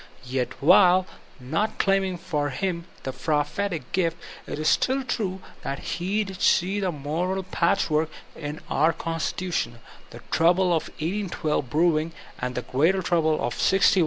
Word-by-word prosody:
Yet 125 0 -2
while 185 +2 +6 0.3
not 160 +13 -1
claiming 195 -2 +1
for 155 -5 -2
him 170 +4 -2 0.2
the 130 - -4
prophetic 155 +6 -1
gift, 170 -3 +1 0.3
it - - -4
is 155 0 -1
still 265 +1 +2
true 200 -7 -2 0.2
that 140 - -3 0.2
he 200 +5 0
did 190 -2 -8
see 190 +3 +3
the 190 -2 0
moral 170 +6 -2
patchwork 160 -3 +1 0.3
in 150 -1 -6
our 155 +4 +3
con 165 0 -4
stitution, 175 -8 -2 0.4
the - - -11
trouble 180 +3 +4
of 160 - -1
1812 160 -5 -2
brewing, 160 +1 +2 0.3
and 125 0 -3
the 125 - -2
greater 170 +8 +2
trouble 165 -3 +2
of 120 -5 -2
'61 - - -9
'65. 195 0 +4
170 Hz, 155 wpm, -25 LUFS, 150-190 Hz, 0.4 s, while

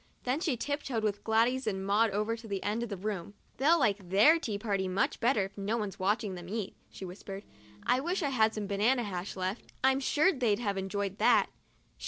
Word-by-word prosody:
Then 255 +4 0
she 310 -7 0
tiptoed 275 -4 -2
with 205 -1 -1
Gladys 235 +4 +2
and 190 -2 -2
Maud 210 +3 +3
over 210 +3 -1
to 230 0 -11
the 200 -2 -3
end 210 +3 -1
of 235 - -3
the 200 - -4
room. 200 0 -4
" - - -36
They'll 315 +5 +4
like 205 - 0
their 220 - +6
tea 215 -10 -3
party 200 -3 -1
much 185 +1 0
better 230 -4 +2
if 195 - -11
no 205 +4 -1
one's 210 -4 -4
watching 205 +1 0
them 175 -1 -8
eat," 210 -2 -4
she 190 - -8
whispered. 195 +2 -8 0.3
" 105 - -23
I 250 +1 +3
wish 345 +6 -1
I 285 - +1
had 220 -4 +2
some 210 -1 -3
banana 215 +6 +2
hash 190 -2 -5
left; 185 +3 -4
I'm 265 0 +4
sure 305 +7 +3
they'd 240 -7 +1
have 205 -4 -2
enjoyed 195 +1 -3
that. - - +4
215 Hz, 225 wpm, -30 LUFS, 195-245 Hz, 0.3 s, their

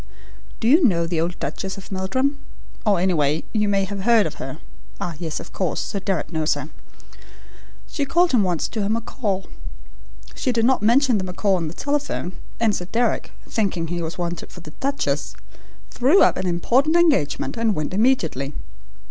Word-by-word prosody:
Do 225 - 0
you 310 +8 +6
know 170 -9 +3
the 165 -1 -1
old 170 +1 -2
Duchess 190 +7 -4
of 195 - -11
Meldrum? 260 +10 0 0.5
Or 200 -4 +4
anyway, 160 -5 +1
you 210 -2 +2
may 195 -1 +2
have 200 0 -5
heard 225 +1 +4
of 155 - -3
her? 130 0 -5 0.4
Ah, 175 - -3
yes, 160 -3 -3
of - - -11
course, 185 -5 -1
Sir 200 - -3
Deryck 185 -4 -2
knows 160 -1 +1
her. - - -6 1.2
She 285 - -2
called 340 +5 +3
him 245 - +4
in 200 - +3
once 175 -4 0
to 220 - -3
her 200 - 0
macaw. 215 -3 -2 0.9
She 255 - -1
did 230 -2 +2
not 260 +1 +3
mention 240 +1 +4
the - - -2
macaw 185 +2 0
on 170 -3 0
the 160 - -7
telephone, 285 -10 -2 0.3
and 225 -2 +3
Sir 180 - -4
Deryck, 230 +4 0 0.2
thinking 185 -7 -1
he 175 0 -2
was 165 0 -4
wanted 175 -1 -4
for 175 - -11
the 155 - -11
duchess, 275 +1 -1 0.6
threw 275 +11 +5
up - - +4
an 185 - -2
important 250 - +2
engagement 315 - +2
and 225 -3 +1
went 150 +3 -3
immediately. 165 - +1
195 Hz, 185 wpm, -22 LUFS, 170-240 Hz, 1.2 s, you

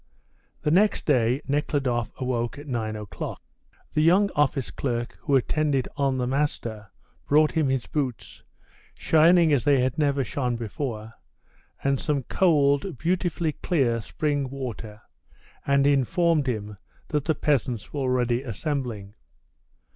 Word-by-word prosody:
The 150 - +1
next 205 +5 +3
day 125 -1 +2
Nekhludoff 135 -5 0
awoke 125 0 -2
at 145 - -9
nine 115 -5 -3
o'clock. 105 -5 -6 0.5
The 155 - +2
young 185 +6 +4
office 145 -3 +1
clerk 120 -3 -3
who 140 - +1
attended 140 0 +1
on 135 -2 0
"the 125 - 0
master" 120 -6 -2 0.4
brought 150 +1 +4
him 155 -4 +1
his 130 -2 0
boots, 135 -6 -4 0.5
shining 165 0 +4
as 130 -5 +2
they 140 -2 +4
had 130 +3 0
never 140 -2 +2
shone 125 0 -2
before, 115 -1 -5 0.7
and 140 -1 +1
some 145 -3 -1
cold, 145 -1 +2
beautifully 170 +1 0
clear 130 -8 0
spring 145 +2 -2
water, 115 -5 -7 0.6
and 140 0 +3
informed 145 +2 +2
him 105 -4 -3 0.3
that 150 -3 -1
the 160 - +1
peasants 125 -7 -1
were 145 - -3
already 125 -2 +1
assembling. 120 -5 -4
135 Hz, 130 wpm, -25 LUFS, 120-150 Hz, 0.7 s, young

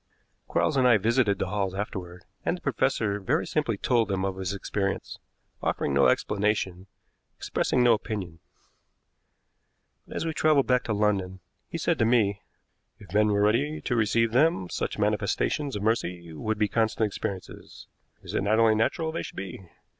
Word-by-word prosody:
Quarles 145 - +1
and 130 -1 +4
I 120 -3 +6
visited 110 -1 +2
the - - -2
Halls 100 -2 -1
afterward, 90 -3 -6 0.2
and 180 - 0
the - - -17
professor 115 -6 0
very 130 - 0
simply 135 -9 -1
told 115 0 +2
them 95 -1 -1
of 95 -1 -2
his 95 -1 -2
experience, 100 0 -3 0.4
offering 70 - -1
no 70 - +5
explanation, 100 -3 0 0.5
expressing 125 - 0
no 120 -1 +6
opinion. 100 -7 -4 1.7
But - - -10
as - - -2
we 160 - -1
traveled 150 -3 +3
back 125 -1 +2
to 110 - -1
London, 100 -3 0 0.3
he - - -4
said - - 0
to 115 - +4
me: 110 -4 +2 0.6
"If 100 -3 -14
men 105 +1 +4
were 100 -1 +2
ready 140 +9 +1
to 125 - -1
receive 115 0 +2
them, 130 - +2
such - - -3
manifestations 145 -4 0
of 105 - -4
mercy 90 -7 -1
would 110 +8 -2
be 105 0 +2
constant 110 0 +1
experiences. 100 -2 -6 0.4
Is - - -8
it - - +1
not 105 +2 +2
only 115 -1 +5
natural 160 +9 0
they 165 - -3
should - - -9
be? 95 -1 -7
105 Hz, 170 wpm, -27 LUFS, 95-120 Hz, 1.7 s, I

